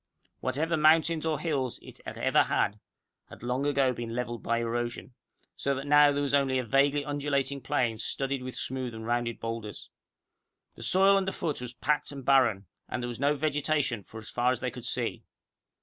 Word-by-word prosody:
Whatever 160 +3 0
mountains 160 +1 +4
or 155 -3 0
hills 135 -7 -1
it - - -12
had - - -6
ever - - +3
had, 105 +1 0 0.5
had - - -13
long 125 +4 -1
ago 135 -3 +2
been 115 -1 -5
leveled 120 -1 -3
by 115 - 0
erosion, 120 +1 -3 0.4
so 140 0 -1
that 135 +1 -5
now 145 0 +6
there 145 0 0
was 140 -1 -2
only 135 -2 +3
a 130 - 0
vaguely 140 +4 +2
undulating 140 -2 -1
plain 120 -3 0
studded 135 +3 -2
with 130 0 -6
smooth 130 -3 -3
and 110 0 -7
rounded 120 0 -1
boulders. 115 -3 -6 0.8
The - - -12
soil 195 +1 +5
underfoot 180 -7 -1
was 125 -1 -6
packed 150 +4 0
and 135 -3 -8
barren, 125 -8 +4 0.2
and 120 - -3
there - - -2
was 120 - -6
no 145 +2 +2
vegetation 145 -5 0
for 110 - -12
as 110 0 -8
far 125 +1 +2
as 130 - -1
they - - -2
could - - -9
see. - - -2
135 Hz, 190 wpm, -29 LUFS, 120-145 Hz, 0.8 s, now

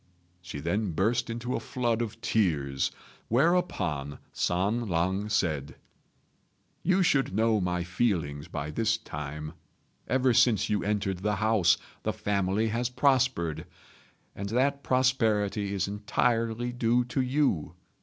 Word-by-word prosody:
She 85 -4 -7
then 95 +5 -1
burst 115 +8 +1
into 120 +2 -3
a - - -1
flood 120 -3 -1
of 115 -3 -4
tears; 70 -10 +1 0.4
whereupon 105 - +1 0.2
San 105 +6 0
lang 95 +5 0
said, 80 -9 -1 1.1
"You 185 0 +3
should 135 - +2
know 110 -1 +2
my 90 -1 -1
feelings 85 -6 -1
by 75 -3 -4
this 110 +4 +1
time. 75 -5 -6 0.5
Ever 130 -1 +2
since 110 -4 +3
you 105 - +1
entered 100 -3 -1
the 105 +2 0
house 105 -4 +3 0.2
the - - -1
family 100 +2 0
has 120 +2 -1
prospered; 125 - +1 0.7
and 100 +1 -5
that 140 +5 +1
prosperity 110 -6 +1
is 100 -2 -1
entirely 115 +3 0
due 120 0 +2
to 130 +2 -1
you. 125 - 0
105 Hz, 125 wpm, -28 LUFS, 90-120 Hz, 1.1 s, You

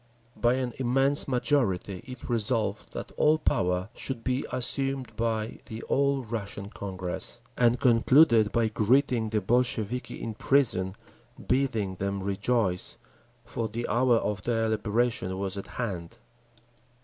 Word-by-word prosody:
By 120 +1 +2
an 130 -2 -2
immense 135 +3 +4
majority 120 -8 0
it 130 -1 -9
resolved 110 -3 -1
that - - -6
all 155 +1 +4
power 90 - 0
should 125 -2 -4
be 130 +1 0
assumed 135 0 0
by 110 -1 -2
the 110 +1 -7
All 140 -1 +1
Russian 105 -3 -5
Congress; 95 -3 -4 0.2
and 120 0 +3
concluded 115 -2 +5
by 115 -1 +1
greeting 115 +1 +2
the 105 -1 0
Bolsheviki 120 +2 0
in 115 - -4
prison, 105 -7 +1 0.5
bidding 115 -8 0
them 100 0 -2
rejoice, 100 -1 0 0.5
for 115 -1 -3
the 115 +2 -4
hour 120 0 +3
of 105 -3 -1
their 115 +1 0
liberation 110 -3 0
was 95 0 -2
at 100 - -6
hand. 90 -8 -5
115 Hz, 130 wpm, -28 LUFS, 100-125 Hz, 0.5 s, concluded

